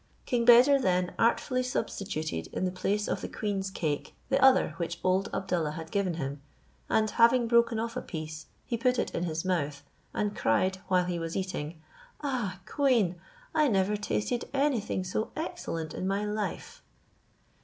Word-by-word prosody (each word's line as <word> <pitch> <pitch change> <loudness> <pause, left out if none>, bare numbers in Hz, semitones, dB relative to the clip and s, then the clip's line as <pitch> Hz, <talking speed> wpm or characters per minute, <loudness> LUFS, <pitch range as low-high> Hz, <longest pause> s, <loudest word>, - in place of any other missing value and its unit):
King 240 -2 +1
Beder 250 +4 +8
then 180 -5 +1
artfully 255 +2 +2
substituted 190 - -3
in - - -2
the 185 - 0
place 200 +3 -1
of - - -2
the - - -4
queen's 195 -2 -2
cake 155 -6 -3
the 270 0 +2
other 265 0 +5
which 170 -1 -3
old 185 +1 +2
Abdallah 175 -5 -1
had 160 0 -7
given 195 -4 0
him, 140 -2 -4 0.5
and 215 0 +3
having 235 +2 +4
broken 235 -1 +4
off 230 +1 -3
a - - -2
piece, 155 -2 -7 0.2
he 235 - -2
put 250 +1 +2
it - - -1
in 170 - -1
his 165 +1 -3
mouth, 150 -6 -1 0.3
and 210 0 -1
cried, 185 +12 +2
while 180 -1 +3
he 175 -1 -2
was 165 0 -3
eating, 170 -4 -4 0.4
"Ah! 240 -10 -2
queen, 225 - +2 0.3
I 305 -2 +4
never 200 -3 +2
tasted 210 +3 -1
anything 255 -9 +1
so 185 +4 -2
excellent 310 - -4
in 185 - -3
my 200 +2 0
life." 210 0 -4
195 Hz, 165 wpm, -29 LUFS, 170-235 Hz, 0.5 s, Beder